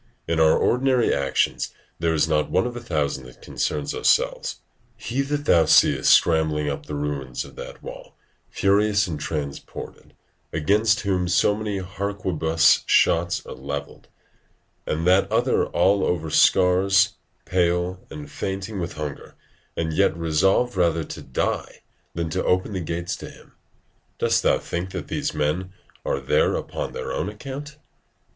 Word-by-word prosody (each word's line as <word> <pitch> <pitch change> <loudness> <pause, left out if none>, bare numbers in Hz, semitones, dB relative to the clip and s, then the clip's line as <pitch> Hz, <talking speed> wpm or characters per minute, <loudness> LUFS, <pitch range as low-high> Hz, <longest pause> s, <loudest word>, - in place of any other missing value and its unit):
In 80 -1 0
our 80 -1 +5
ordinary 125 -1 +2
actions 70 -1 0 0.2
there 80 -1 +1
is 80 +1 +2
not 75 -1 +1
one 95 - +2
of 120 -1 -4
a - - -4
thousand 70 - -2
that 65 -1 -14
concerns 75 -2 -3
ourselves. - - +1 0.4
He 120 +4 -2
that 145 +1 -2
thou 85 -2 +5
seest - - +4
scrambling 80 -2 +3
up 70 0 -4
the 75 - -4
ruins 70 -4 -3
of - - -14
that - - -9
wall, - - -10 0.3
furious 100 +1 +2
and 80 -4 -5
transported, 70 -3 -6 0.4
against 105 +7 +2
whom 95 -3 0
so 90 +3 +3
many 105 -1 -3
harquebuss 95 -3 +1
shots 85 +1 +2
are - - -7
levelled; 70 +1 -7 0.8
and 80 +2 -1
that 95 +2 +3
other - - +2
all 100 +1 +2
over 80 -3 -1
scars, 95 +3 +4 0.3
pale, 90 0 0
and 75 -2 -9
fainting 95 +1 -4
with 85 -1 -4
hunger, 75 -2 -7 0.4
and 80 -1 -1
yet 80 - +2
resolved 95 +8 +2
rather 85 -3 +2
to - - -8
die - - -3 0.3
than 85 -1 -2
to 95 - -1
open 95 +3 +1
the 95 - -2
gates 85 +1 -3
to - - -9
him; - - -17 0.7
dost - - +2
thou - - +3
think 85 +2 -4
that - - -6
these - - -2
men 90 +6 -1 0.3
are 70 - -1
there 70 - +2
upon - - -4
their - - -5
own 90 - -2
account? 135 +7 -8
85 Hz, 150 wpm, -23 LUFS, 75-100 Hz, 0.8 s, our